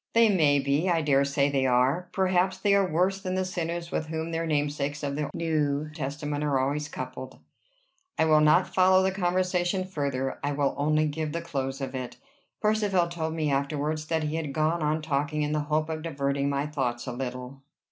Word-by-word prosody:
"They 230 Hz, -1 st, +5 dB
may 155 Hz, -7 st, +4 dB
be. 140 Hz, +6 st, +1 dB
I 165 Hz, -2 st, +2 dB
dare 140 Hz, -2 st, +3 dB
say 140 Hz, 0 st, +1 dB
they 135 Hz, -1 st, +1 dB
are. 130 Hz, +8 st, +2 dB
Perhaps 185 Hz, 0 st, +1 dB
they 200 Hz, +1 st, +2 dB
are 195 Hz, -3 st, +3 dB
worse 185 Hz, +4 st, +1 dB
than 185 Hz, -1 st, -3 dB
the 185 Hz, 0 st, 0 dB
sinners 170 Hz, -1 st, -4 dB
with 155 Hz, -, -2 dB
whom 160 Hz, +1 st, -4 dB
their 165 Hz, 0 st, -2 dB
namesakes 145 Hz, -1 st, -1 dB
of 140 Hz, -1 st, -2 dB
the 150 Hz, 0 st, -2 dB
New 155 Hz, -3 st, -1 dB
Testament 145 Hz, 0 st, -3 dB
are 145 Hz, -2 st, +1 dB
always 145 Hz, +3 st, -1 dB
coupled." 130 Hz, 0 st, -7 dB, 0.8 s
I -, -, +3 dB
will 155 Hz, -1 st, +5 dB
not 155 Hz, +4 st, +4 dB
follow 185 Hz, 0 st, +5 dB
the 190 Hz, -, +2 dB
conversation 180 Hz, 0 st, 0 dB
further. 140 Hz, -7 st, -3 dB
I 145 Hz, 0 st, 0 dB
will 140 Hz, -1 st, +1 dB
only 155 Hz, +2 st, +2 dB
give 155 Hz, 0 st, -3 dB
the 170 Hz, -, -2 dB
close 135 Hz, -5 st, -4 dB
of 135 Hz, -, -4 dB
it. 130 Hz, -2 st, -5 dB, 0.5 s
Percivale 205 Hz, -5 st, +2 dB
told 160 Hz, -2 st, -3 dB
me 155 Hz, -3 st, 0 dB
afterwards 150 Hz, +2 st, -1 dB
that 160 Hz, -1 st, 0 dB
he 155 Hz, +1 st, -2 dB
had 150 Hz, -4 st, -4 dB
gone 155 Hz, +2 st, +1 dB
on 155 Hz, +1 st, 0 dB
talking 150 Hz, 0 st, -1 dB
in 150 Hz, -, -1 dB
the 150 Hz, -, +1 dB
hope 155 Hz, 0 st, +1 dB
of 160 Hz, -1 st, -4 dB
diverting 140 Hz, -3 st, -1 dB
my 140 Hz, 0 st, 0 dB
thoughts 130 Hz, -5 st, -2 dB
a 125 Hz, -, -4 dB
little. 125 Hz, +1 st, -6 dB
155 Hz, 200 wpm, -27 LUFS, 140-170 Hz, 0.8 s, They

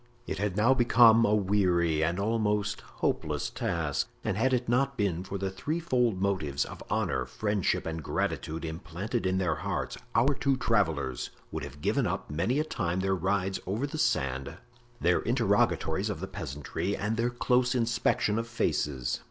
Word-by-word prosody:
It 95 Hz, -, -4 dB
had 100 Hz, -2 st, -1 dB
now 115 Hz, +5 st, +5 dB
become 115 Hz, -2 st, +6 dB
a 105 Hz, -, +3 dB
weary 90 Hz, -6 st, +2 dB
and 85 Hz, +3 st, 0 dB
almost 105 Hz, -1 st, 0 dB
hopeless -, -, -2 dB
task, 80 Hz, -5 st, -1 dB
and -, -, -1 dB
had 115 Hz, +6 st, +2 dB
it 125 Hz, -1 st, 0 dB
not 135 Hz, +3 st, +1 dB
been 95 Hz, -5 st, 0 dB
for 100 Hz, +1 st, -5 dB
the 95 Hz, 0 st, -2 dB
threefold 125 Hz, -, 0 dB
motives 95 Hz, -8 st, 0 dB
of -, -, -9 dB
honor, 65 Hz, -1 st, 0 dB
friendship 105 Hz, -3 st, 0 dB
and 80 Hz, 0 st, -3 dB
gratitude, 80 Hz, +2 st, -2 dB
implanted 85 Hz, +7 st, -3 dB
in 95 Hz, 0 st, +1 dB
their 90 Hz, -5 st, 0 dB
hearts, -, -, -3 dB, 0.2 s
our 130 Hz, +5 st, +4 dB
two 135 Hz, -1 st, +1 dB
travelers 80 Hz, -, 0 dB, 0.2 s
would -, -, -4 dB
have 75 Hz, +3 st, -9 dB
given -, -, +1 dB
up -, -, -3 dB
many 85 Hz, -, 0 dB
a 150 Hz, -, +2 dB
time 90 Hz, -, -2 dB
their 95 Hz, 0 st, +1 dB
rides 95 Hz, +1 st, 0 dB
over 105 Hz, +8 st, -1 dB
the 150 Hz, +2 st, -5 dB
sand, 65 Hz, -, 0 dB, 0.4 s
their 90 Hz, +1 st, +3 dB
interrogatories 115 Hz, -4 st, +1 dB
of -, -, -3 dB
the -, -, -3 dB
peasantry 75 Hz, +8 st, -4 dB
and 105 Hz, +2 st, -1 dB
their 115 Hz, +2 st, +1 dB
close 125 Hz, +1 st, +1 dB
inspection 115 Hz, -2 st, +1 dB
of 115 Hz, -, -3 dB
faces. 65 Hz, -, -1 dB
100 Hz, 170 wpm, -29 LUFS, 85-115 Hz, 0.4 s, become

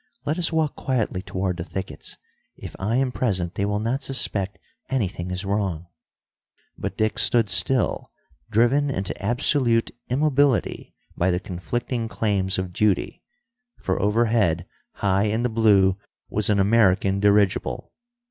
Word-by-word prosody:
Let 155 Hz, +4 st, -1 dB
us 175 Hz, -, +2 dB
walk 160 Hz, -3 st, 0 dB
quietly 115 Hz, -8 st, -1 dB
toward 95 Hz, -1 st, -3 dB
the 85 Hz, -, -4 dB
thickets. 95 Hz, +1 st, -6 dB, 0.4 s
If -, -, -9 dB
I 105 Hz, +5 st, -1 dB
am 130 Hz, 0 st, +1 dB
present, 95 Hz, -9 st, -1 dB
they 100 Hz, -, -1 dB
will 105 Hz, 0 st, -1 dB
not 120 Hz, +6 st, -1 dB
suspect 100 Hz, -7 st, 0 dB, 0.3 s
anything 95 Hz, -8 st, -2 dB
is 90 Hz, +2 st, -3 dB
wrong." 95 Hz, -5 st, -1 dB, 0.9 s
But -, -, -5 dB
Dick 110 Hz, 0 st, 0 dB
stood 115 Hz, -4 st, +3 dB
still, 120 Hz, +5 st, +1 dB, 0.4 s
driven 120 Hz, +6 st, +3 dB
into 95 Hz, -8 st, -2 dB
absolute 120 Hz, +1 st, +1 dB, 0.2 s
immobility 140 Hz, -1 st, +1 dB, 0.2 s
by 90 Hz, -, +1 dB
the 90 Hz, -1 st, +1 dB
conflicting 115 Hz, +7 st, -3 dB
claims 100 Hz, -4 st, 0 dB
of 95 Hz, -1 st, -3 dB
duty. 105 Hz, 0 st, 0 dB, 0.6 s
For -, -, -2 dB
overhead, 105 Hz, -5 st, +2 dB, 0.3 s
high 100 Hz, 0 st, +1 dB
in 110 Hz, +3 st, 0 dB
the 125 Hz, -, +1 dB
blue, 100 Hz, -4 st, +3 dB, 0.3 s
was 105 Hz, 0 st, 0 dB
an 105 Hz, -, +3 dB
American 100 Hz, -2 st, +3 dB
dirigible. 100 Hz, -1 st, +1 dB
105 Hz, 140 wpm, -23 LUFS, 95-120 Hz, 0.9 s, stood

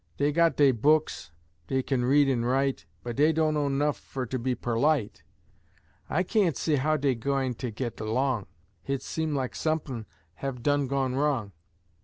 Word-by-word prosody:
Dey 145 Hz, +1 st, +2 dB
got 165 Hz, -1 st, +3 dB
dey 140 Hz, -2 st, +6 dB
books, 150 Hz, -, +1 dB, 0.4 s
dey 130 Hz, 0 st, 0 dB
kin 130 Hz, -2 st, 0 dB
read 140 Hz, +3 st, +4 dB
an' 125 Hz, -3 st, +1 dB
write, 130 Hz, -7 st, 0 dB, 0.2 s
But 120 Hz, -1 st, -5 dB
dey 150 Hz, +3 st, +5 dB
dunno 155 Hz, -2 st, +1 dB
'nough 145 Hz, +1 st, 0 dB
fer 130 Hz, -2 st, -5 dB
to 130 Hz, +2 st, -3 dB
be 125 Hz, +1 st, -1 dB
perlite. 120 Hz, 0 st, 0 dB, 0.9 s
I 175 Hz, +5 st, +1 dB
kain't 190 Hz, -, +1 dB
see 155 Hz, -3 st, +1 dB
how 155 Hz, +3 st, +1 dB
dey 140 Hz, -2 st, +1 dB
gwine 130 Hz, +2 st, -1 dB
git 120 Hz, 0 st, -5 dB
erlong, 115 Hz, 0 st, 0 dB, 0.3 s
Hit 135 Hz, -1 st, -3 dB
seem 160 Hz, -2 st, -2 dB
lak 130 Hz, -2 st, -2 dB
sump'n 145 Hz, -8 st, -2 dB, 0.3 s
have 130 Hz, -3 st, -5 dB
done 145 Hz, -1 st, +2 dB
gone 135 Hz, -1 st, 0 dB
wrong. 135 Hz, -7 st, 0 dB
135 Hz, 165 wpm, -27 LUFS, 125-150 Hz, 0.9 s, dey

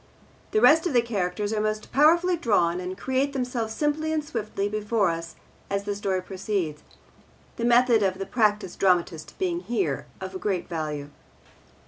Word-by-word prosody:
The 430 Hz, -, +1 dB
rest 320 Hz, +3 st, +6 dB
of 325 Hz, -, -2 dB
the 240 Hz, -, +5 dB
characters 205 Hz, -2 st, -2 dB
are 215 Hz, -, 0 dB
most 215 Hz, 0 st, -2 dB
powerfully 340 Hz, +6 st, +4 dB
drawn 190 Hz, -, +1 dB
and 185 Hz, +1 st, -5 dB
create 265 Hz, +4 st, 0 dB
themselves 245 Hz, -4 st, -2 dB
simply 305 Hz, +3 st, 0 dB
and 310 Hz, -1 st, -1 dB
swiftly 215 Hz, -7 st, -3 dB
before 210 Hz, -2 st, +1 dB
us 165 Hz, 0 st, -6 dB, 0.3 s
as 200 Hz, 0 st, -1 dB
the 205 Hz, 0 st, -2 dB
story 190 Hz, -2 st, -1 dB
proceeds, 185 Hz, -5 st, -3 dB, 0.8 s
the 235 Hz, -, -1 dB
method 240 Hz, -1 st, +5 dB
of 190 Hz, -2 st, +1 dB
the 195 Hz, -, -4 dB
practised 210 Hz, -5 st, 0 dB
dramatist 175 Hz, -4 st, +1 dB
being 355 Hz, -2 st, -1 dB
here 195 Hz, -, -2 dB
of 190 Hz, -1 st, -6 dB
great 190 Hz, -4 st, -1 dB
value. 150 Hz, -4 st, -4 dB
210 Hz, 160 wpm, -26 LUFS, 185-255 Hz, 0.8 s, rest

